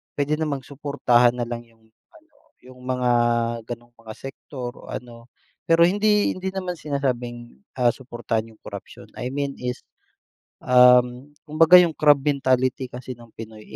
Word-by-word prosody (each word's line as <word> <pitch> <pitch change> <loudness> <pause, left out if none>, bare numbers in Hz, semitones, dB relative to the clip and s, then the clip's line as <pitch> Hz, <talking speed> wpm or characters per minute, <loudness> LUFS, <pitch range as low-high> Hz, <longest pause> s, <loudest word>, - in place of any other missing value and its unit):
puwede 145 +1 0
namang 145 -4 -2
suportahan 125 -4 +2
na 120 -1 -3
lang 120 0 -5
yung 115 -1 -27 0.2
ano, 320 -2 -23 0.3
yung 130 0 -15
mga 125 -1 -1 0.5
gano'ng 120 +1 -9
mga 110 -1 -11
sektor 135 0 -8
o - - -12
ano, 120 -1 -9 0.3
pero 170 +1 +5
hindi 210 +2 +2
hindi 190 +1 -4
naman 185 -2 -4
sinasabing, 125 - -4 0.2
ah, 120 - +4
suportahan 120 -3 -4
yung 110 - -22
korapsiyon, - - -10
I 125 +1 -5
mean 140 0 -3
is, 125 0 -4 0.8
um, 125 +1 +4 0.2
kumbaga 165 +4 +7
yung 170 -3 +3
crab 145 -1 +5
mentality 130 -2 0
kasi 125 +1 -8
ng 120 -1 -17
Pinoy 110 -1 -11
125 Hz, 150 wpm, -23 LUFS, 120-150 Hz, 0.8 s, kumbaga